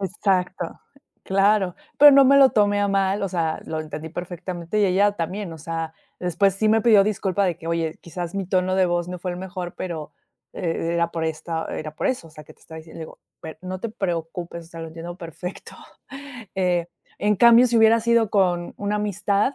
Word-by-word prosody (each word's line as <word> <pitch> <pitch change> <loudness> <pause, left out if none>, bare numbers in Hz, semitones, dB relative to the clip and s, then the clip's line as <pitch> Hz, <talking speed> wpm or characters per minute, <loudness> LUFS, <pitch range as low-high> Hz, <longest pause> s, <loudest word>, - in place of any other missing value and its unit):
exacto, 185 -2 -1 0.5
claro, 195 -1 +2 0.2
pero 290 +1 +10
no 275 0 +7
me 275 +2 +6
lo 270 -1 +7
tomé 205 -1 +2
a 205 - +2
mal, 195 0 +1
o 195 - 0
sea, 165 -3 -1
lo 160 -1 -3
entendí 155 +1 -7
perfectamente, 175 +2 -5
y - - +4
ella 200 +2 +3
también, 185 +1 -4
o - - -11
sea, 165 +1 -5 0.3
después 180 +3 +2
sí 215 +2 +1
me 220 0 +3
pidió 215 -3 +6
disculpa 200 -2 0
de 175 -3 0
que: 165 - -10
"Oye, 165 -1 -1
quizás 175 +1 -6
mi 195 -2 -3
tono 185 0 +1
de 190 - +4
voz 175 0 -1
no 180 0 -5
fue 180 - -3
el 175 - -7
mejor, 180 -1 -6
pero, 160 -5 -5 0.4
eh, - - -7 0.3
e - - -1
era 170 0 +1
por 165 -1 -2
esta, 160 +1 -3
era 155 -1 -6
por - - -2
eso, 255 -10 -2
o - - -19
sea 150 -1 -13
que - - -15
te - - -32
estaba 160 - -12
diciendo". 160 +1 -12
Le 160 - -5
digo: - - -15 0.2
"A - - -8
ver, 160 - -10
no 185 0 -5
te 230 - -3
preocupes, 170 -3 -4
o - - -19
sea, 165 -1 -9
lo 165 - -6
entiendo 165 +2 -8
perfecto". 175 +2 -8 0.8
Eh, 175 -2 +1 0.3
en 210 +1 +2
cambio, 235 +3 +7
si 235 - +1
hubiera 225 +1 +5
sido 235 -1 +2
con, 180 -4 +1
una 205 +1 -1
amistad, 205 +4 0
180 Hz, 220 wpm, -23 LUFS, 170-205 Hz, 0.8 s, pero